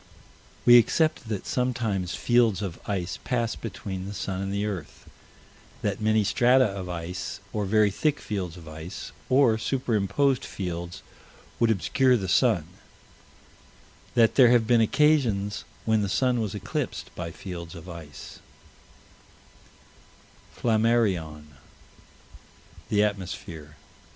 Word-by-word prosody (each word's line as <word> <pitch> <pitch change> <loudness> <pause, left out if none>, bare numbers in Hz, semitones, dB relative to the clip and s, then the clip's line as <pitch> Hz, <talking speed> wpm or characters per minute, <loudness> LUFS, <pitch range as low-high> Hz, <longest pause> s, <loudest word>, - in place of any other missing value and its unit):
We 120 0 +9
accept 155 0 +1
that 105 -4 -3
sometimes 115 -8 -1
fields 115 -4 +2
of 90 -4 -5
ice 95 -3 -3
pass 115 -2 -1
between 95 -4 -6
the 100 - -6
sun 95 -1 -3
and 95 0 -3
the 100 +1 -1
earth: 95 -8 -6 0.8
that 105 0 -1
many 110 0 +3
strata 125 +5 +4
of 95 -3 -4
ice, 85 +1 -5
or 105 -2 -1
very 105 0 +3
thick 150 +8 0
fields 95 -5 -4
of 80 -2 -12
ice, 80 +6 -8 0.2
or 130 -4 +4
superimposed 125 +2 +1
fields 85 -2 -5 0.6
would 115 - +3
obscure 125 +5 +3
the 95 -4 -4
sun 100 - +3 1.5
that 115 -2 +5
there 125 -3 +7
have 120 -2 +4
been 120 0 +4
occasions 110 -6 +2 0.2
when 110 -1 +2
the 100 - -1
sun 125 +3 +1
was 105 -2 -3
eclipsed 120 - -4
by 85 -1 -5
fields 85 -1 -8
of 85 +1 -10
ice: 85 -5 -10 2.2
Flammarion, 110 -9 +1 1.5
The 105 0 +3
Atmosphere, 90 -7 -5
p. - - -27
105 Hz, 125 wpm, -26 LUFS, 90-120 Hz, 2.2 s, We